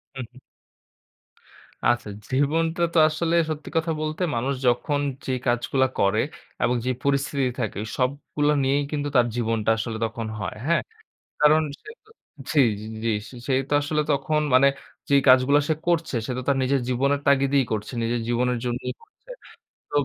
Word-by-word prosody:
হু, 130 - -5
হু। 130 - -19 1.5
আচ্ছা, 120 -3 +1 0.2
জীবনটা 160 +5 +1
তো - - +1
আসলে 165 +2 -1
সত্যি 155 -1 -5
কথা 160 0 0
বলতে, 155 +3 -3
মানুষ 130 +4 0
যখন 145 +4 +1 0.3
যে 130 - -2 0.2
কাজগুলা 125 +2 +2
করে 100 +3 +3 0.4
এবং 125 - +2
যে 130 - +1
পরিস্থিতি 140 -1 +1
থাকে 110 -3 -2 0.2
সবগুলা 145 +3 0
নিয়েই 140 +2 +2
কিন্তু 145 -1 -2
তার 120 -1 +5
জীবনটা 115 -2 0
আসলে 110 0 -3
তখন 110 0 -5
হয়। 100 0 -4
হ্যাঁ? 170 +1 +2 0.6
কারণ, 155 +1 +6 0.2
সে - - -12 0.2
তো - - -24 0.4
জি, 150 - +3 0.2
জি, - - -8 0.2
জি। 115 - +1 0.4
সে 135 - +1 0.2
তো - - 0
আসলে 150 +1 0
তখন 150 +2 +1
মানে 135 +2 +6 0.4
যেই 140 -1 +5
কাজগুলা 130 +3 +6
সে - - +4
করছে 170 -6 +1
সে - - -4
তো - - -2
তার 140 - +3
নিজের 135 0 +1
জীবনের 140 +3 +1
তাগিদেই 140 0 +4
করছে। 110 +3 -3
নিজের 115 0 -1
জীবনের 125 +1 +1
জন্যই 120 +1 -2
করছে। 455 +3 -25 0.6
তোব 145 -1 +2
140 Hz, 160 wpm, -24 LUFS, 120-150 Hz, 1.5 s, কারণ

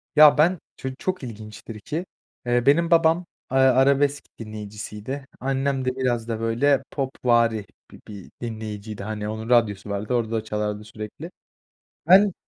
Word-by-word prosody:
Ya, 150 -1 +8
ben 170 +2 +4 0.2
ço 130 - -4
çok 185 -3 -3
ilginçtir 110 -1 -8
ki, 160 - -4 0.4
eee, 120 0 +1
benim 165 +4 +4
babam, 165 +1 +4 0.3
ııı, 135 - +3
arabesk 140 +2 +4 0.2
dinleyicisiydi. 110 +4 -7
Annem 135 0 -1
de 130 0 0
biraz 120 -3 -1
da, 115 -1 -3
böyle, 120 +5 +2
popvari 120 -5 +1 0.3
bi - - -13
bir 100 -3 -10
dinleyiciydi. 110 -3 -6
Hani, 105 0 -4
onun 110 +2 -5
radyosu 105 -4 +2
vardı, 100 +4 -2
orada 115 -2 0
çalardı 105 -1 -3
sürekli. 105 0 -8 0.8
Ben 195 +1 +7
120 Hz, 140 wpm, -24 LUFS, 110-140 Hz, 0.8 s, Ya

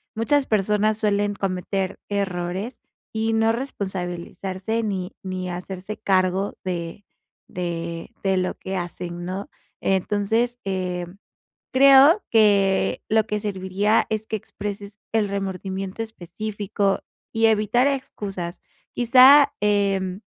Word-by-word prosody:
muchas 265 +6 +2
personas, 210 0 +1
suelen 205 -1 +1
cometer 190 -1 -2
errores, 195 +3 -3 0.3
y 225 0 0
no 225 0 +3
responsabilizarse, 190 -2 -3
ni 190 -3 -3
ni 185 -1 -4
hacerse 185 +3 -6
cargo 190 -1 +1
de 175 +1 -4 0.4
de 170 -1 -4
de 190 -1 +2
lo 180 0 0
que 190 - -6
hacen 175 0 -5
¿no? 190 +3 -5 0.3
Entonces, 210 +5 0
em, 180 -1 -3 0.6
creo 275 +7 +7
que 200 -3 +3
lo 220 0 +3
que 210 -1 -1
serviría, 200 +1 +1
es 220 0 -2
que 220 - -2
expreses 205 0 -7
el 220 -2 +2
remordimiento 195 +1 -4
específico, 205 0 -3 0.3
y 225 0 +3
evitar 220 +3 +3
excusas. 200 -10 -3 0.3
Quizá, 265 +4 +7
em, 200 -2 +1
200 Hz, 110 wpm, -23 LUFS, 185-220 Hz, 0.6 s, creo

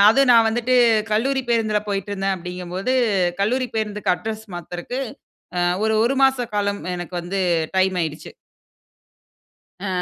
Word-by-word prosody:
அதுவும் 270 +1 +4
நான் 230 -1 +6
வந்துட்டு 240 +2 0 0.4
கல்லூரி 265 +5 +1
பேருந்துல 220 -3 +2
போயிட்டுருந்தேன் 195 -1 -1
அப்டிங்கும்போது, 180 +6 -3 0.5
கல்லூரி 250 +4 0
பேருந்துக்கு 210 -3 0
அட்ரஸ் 220 +1 -6
மாத்துறதுக்கு 175 +9 -5 0.6
அ, - - +2 0.2
ஒரு, 220 0 +2
1 245 - +2
மாச 265 -2 +3
காலம் 200 0 0
எனக்கு 175 0 -6
வந்து 190 +3 -3 0.4
டைம் 190 0 +2
ஆயிடுச்சு. 160 -2 -4 1.6
அ. - - -2
210 Hz, 125 wpm, -22 LUFS, 185-240 Hz, 1.6 s, நான்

